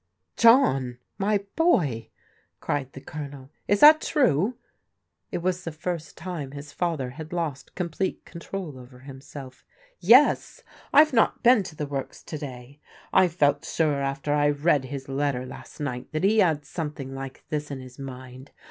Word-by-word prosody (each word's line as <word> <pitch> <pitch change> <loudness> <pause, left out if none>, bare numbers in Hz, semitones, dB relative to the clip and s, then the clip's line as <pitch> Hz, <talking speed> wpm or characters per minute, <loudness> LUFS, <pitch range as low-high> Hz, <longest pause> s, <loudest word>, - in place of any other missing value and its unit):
"John, 135 - +4 0.2
my 200 0 +1
boy!" 155 - +2 0.5
cried 140 -3 -2
the 135 - -9
Colonel, 140 -2 -8 0.2
"is 205 0 +2
that 310 +1 +9
true?" 230 - +2 0.7
It 170 - -3
was 180 0 -1
the 165 - -4
first 160 0 -5
time 165 -6 -6
his 145 0 -9
father 160 -8 -2
had 155 +4 -9
lost 165 -6 -4
complete 180 +1 -3
control 170 -4 -7
over 125 0 -14
himself. 135 -1 -11 0.2
" - - -35 0.2
Yes. - - +3 0.3
I 295 +2 +9
have 310 -2 -5
not 225 -3 +2
been 245 -2 +6
to 185 -4 -8
the 150 -1 -3
works 140 -2 -5
to 155 - -6
day. 130 -1 -9 0.3
I 185 -1 +6
felt 145 -4 +1
sure 150 -4 0
after 140 +1 -1
I 145 0 +3
read 145 -1 +2
his 135 0 -6
letter 135 -2 -1
last 130 - -11
night 130 -4 -4
that 155 - -1
he 215 +3 +4
had 160 -7 +2
some 155 -3 -4
thing, 135 -2 -7
like 135 0 -7
this 150 -1 -3
in 140 -2 -5
his 130 0 -12
mind. 130 0 -9
145 Hz, 170 wpm, -26 LUFS, 135-180 Hz, 0.7 s, that